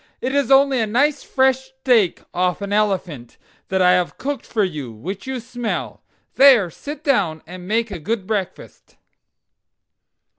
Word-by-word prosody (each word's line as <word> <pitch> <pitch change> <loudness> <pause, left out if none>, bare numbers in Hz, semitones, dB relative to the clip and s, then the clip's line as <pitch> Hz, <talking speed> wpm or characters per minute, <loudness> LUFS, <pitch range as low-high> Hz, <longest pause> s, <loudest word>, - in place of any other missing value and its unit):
"It 260 - -3
is 280 -3 +1
only 270 -1 +4
a 220 - 0
nice 280 +6 +1
fresh 265 -1 +2
steak 255 -7 +1
off 180 +2 -1
an 200 0 -3
elephant, 190 - -1 0.3
that 190 0 +1
I 180 - +6
have 180 -1 0
cooked 285 0 -4
for 215 -3 0
you, 150 -10 -4
which 180 - -7
you 265 -1 -3
smell. 240 0 -5 0.4
There, 250 -10 +6
sit 295 - -8
down 190 - 0
and 180 +2 -10
make 225 +1 0
a 185 - -5
good 200 +4 -3
breakfast." 200 -3 -5
215 Hz, 155 wpm, -20 LUFS, 180-265 Hz, 0.4 s, I